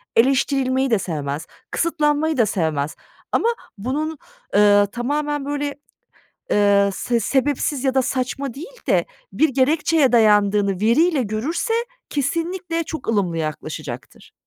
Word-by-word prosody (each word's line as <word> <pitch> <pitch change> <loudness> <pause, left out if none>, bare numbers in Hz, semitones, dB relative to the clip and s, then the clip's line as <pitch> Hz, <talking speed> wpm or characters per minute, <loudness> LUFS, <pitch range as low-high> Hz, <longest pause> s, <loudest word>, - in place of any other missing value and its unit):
eleştirilmeyi 265 +1 +2
de 220 - +3
sevmez, 150 -3 -4 0.2
kısıtlanmayı 315 -2 +1
da 235 - +4
sevmez 160 -7 -1 0.4
ama 460 - +2 0.3
bunun, 295 +9 -3 0.4
eee, 205 0 +5
tamamen 290 +4 -2
böyle, 285 0 -2 0.8
eee, 200 -1 +4
se 235 +3 -1
sebepsiz 275 +3 0
ya 265 -1 +1
da 265 - +3
saçma 255 0 -2
değil 470 - -10
de - - +3 0.3
bir 315 - +3
gerekçeye 280 +1 +2
dayandığını 205 -4 +3
veriyle 275 +7 +3
görürse, 260 - -2 0.4
kesinlikle 335 +4 -2
çok 315 -6 -7
ılımlı 195 -7 0
yaklaşacaktır. 155 -4 -6
260 Hz, 115 wpm, -21 LUFS, 205-295 Hz, 0.8 s, eee